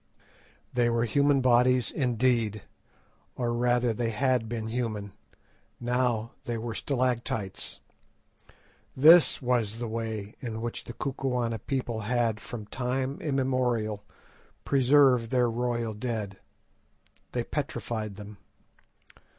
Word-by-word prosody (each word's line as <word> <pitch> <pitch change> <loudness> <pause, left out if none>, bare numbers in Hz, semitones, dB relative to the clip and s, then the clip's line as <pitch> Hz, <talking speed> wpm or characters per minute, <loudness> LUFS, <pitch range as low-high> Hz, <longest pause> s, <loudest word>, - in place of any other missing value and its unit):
They 120 -1 +3
were 115 0 +1
human 140 +4 +3
bodies 125 -1 +4
indeed, 120 - +1 0.7
or 120 -2 -1
rather 120 0 +2
they 115 +1 -1
had 125 0 +1
been 115 -2 -3
human; 110 -4 -3 0.7
now 120 -2 0
they 120 -1 -2
were 115 0 -4
stalactites. 120 -6 -2 1.2
This 160 +1 +7
was 120 -4 +1
the 120 0 -3
way 110 -2 -4
in 115 -3 -5
which 115 +1 -4
the 120 - -7
Kukuana 125 -4 -2
people 120 -2 -3
had 115 0 0
from 110 0 -7
time 130 +4 -2
immemorial 125 -7 0 0.6
preserved 135 -3 +4
their 125 -2 +2
royal 120 -1 -1
dead. 105 -3 -4 0.9
They - - 0
petrified 110 -3 -4
them. 105 0 -10
120 Hz, 110 wpm, -28 LUFS, 110-125 Hz, 1.2 s, This